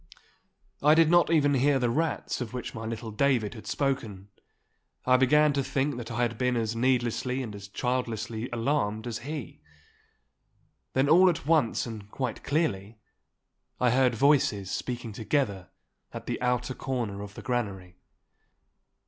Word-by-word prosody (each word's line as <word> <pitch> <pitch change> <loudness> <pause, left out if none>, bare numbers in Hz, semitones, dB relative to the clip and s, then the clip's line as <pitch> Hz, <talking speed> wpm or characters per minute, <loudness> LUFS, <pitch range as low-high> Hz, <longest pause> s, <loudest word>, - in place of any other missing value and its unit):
I 150 +2 +6
did 165 0 +5
not 175 0 +5
even 145 -3 +3
hear 140 +1 +3
the 120 -2 +1
rats 160 0 -1
of 125 0 -5
which 125 - -5
my 110 0 -6
little 115 0 -5
David 120 -1 +1
had 110 - -11
spoken. 110 -9 -2 0.8
I 130 - +5
began 150 +3 +4
to 140 -1 0
think 140 +1 -1
that 120 -1 -6
I 120 +1 -1
had 120 -2 -2
been 125 -1 +1
as 115 0 -1
needlessly 125 +1 0
and 110 -4 -6
as 100 -1 -9
childlessly 115 0 -3
alarmed 115 -3 -1
as 115 -3 -4
he. 145 -1 -7 1.3
Then 135 +2 +2
all 180 +5 +7
at 165 -4 -2
once 150 -7 +2
and 110 -3 -8
quite 130 +1 -4
clearly 115 - -1 0.8
I 125 -1 +3
heard 125 -1 +3
voices 115 -8 +2
speaking 120 -2 -4
together 105 - -1 0.4
at - - -8
the - - -3
outer 125 0 0
corner 120 -7 -3
of 100 0 -9
the - - -9
granary. 100 -8 -3
125 Hz, 155 wpm, -28 LUFS, 110-140 Hz, 1.3 s, all